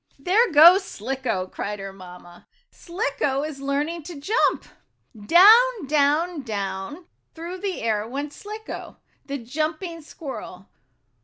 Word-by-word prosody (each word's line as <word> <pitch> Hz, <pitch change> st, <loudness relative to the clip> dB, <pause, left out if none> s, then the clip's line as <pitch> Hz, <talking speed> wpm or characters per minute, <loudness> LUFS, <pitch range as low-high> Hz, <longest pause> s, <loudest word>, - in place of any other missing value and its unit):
"There 390 Hz, -, +2 dB
goes 340 Hz, +6 st, +8 dB
Slicko!" 235 Hz, -, -3 dB
cried 205 Hz, +2 st, -5 dB
her 195 Hz, -1 st, -8 dB
mamma. 180 Hz, -2 st, -14 dB, 0.2 s
"Slicko 340 Hz, -, -2 dB
is 305 Hz, -2 st, -6 dB
learning 290 Hz, +5 st, -2 dB
to 340 Hz, -4 st, -8 dB
jump!" 420 Hz, -, +1 dB, 0.6 s
Down, 435 Hz, -, +6 dB
down, 300 Hz, +3 st, +1 dB
down 200 Hz, -, -5 dB, 0.3 s
through 340 Hz, +3 st, -7 dB
the 385 Hz, -, -4 dB
air 215 Hz, -1 st, -1 dB
went 285 Hz, +4 st, -5 dB
Slicko, 430 Hz, +1 st, -9 dB, 0.3 s
the 280 Hz, 0 st, -3 dB
jumping 315 Hz, +7 st, -4 dB
squirrel. 265 Hz, -, -9 dB
290 Hz, 115 wpm, -23 LUFS, 225-350 Hz, 0.6 s, goes